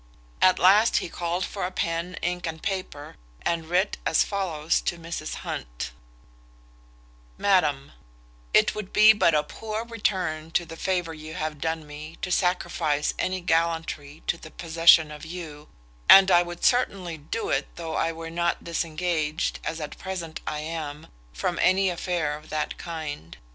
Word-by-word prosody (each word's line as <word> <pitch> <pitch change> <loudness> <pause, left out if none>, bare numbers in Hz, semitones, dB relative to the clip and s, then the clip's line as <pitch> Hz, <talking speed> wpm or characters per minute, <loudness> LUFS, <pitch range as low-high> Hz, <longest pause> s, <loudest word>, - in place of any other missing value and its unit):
At 185 - +6
last 205 +5 +5
he - - -2
called 175 +2 -2
for 190 -3 -3
pen, 170 0 -2
ink, 175 0 -1
and 160 0 -5
paper, 185 -7 -4 0.3
and 165 -1 -1
writ 185 +4 +1
as - - +3
follows 170 -6 -1
to 175 - -2
Mrs 165 -2 -5
Hunt: - - -5 1.5
"MADAM, 150 -9 +2 0.6
"It - - +4
would 210 -3 -6
be 215 +1 +8
but 170 -7 +3
a 150 - +3
poor 220 +7 -5
return 185 -9 -2
to 175 - +2
the 165 - -9
favour 175 -1 -1
you 155 +1 -9
have 155 -2 -4
done 160 -1 -2
me 150 +2 -9
to 180 - -2
sacrifice 175 -5 +1
any 185 0 -1
gallantry 165 -3 -1
to 170 - -1
the 155 - -10
possession 165 -1 +5
of 150 -1 -9
you, 160 -3 -8 0.4
and 190 0 +10
I 175 -1 +7
would 175 0 -4
certainly 190 -9 +1
do 155 +10 -4
it, - - 0
though 165 -2 -5
I 165 - +1
were 165 0 -7
not 170 0 0
disengaged, 165 -1 -1
as 165 - -3
at 150 - -7
present 175 -4 -5
I 150 0 -2
am, 155 -1 -6 0.2
from 170 - -2
any 190 0 +4
affair 170 -4 -1
of 155 +1 -13
that 155 -1 -3
kind. 155 - -6
165 Hz, 160 wpm, -26 LUFS, 155-180 Hz, 1.5 s, and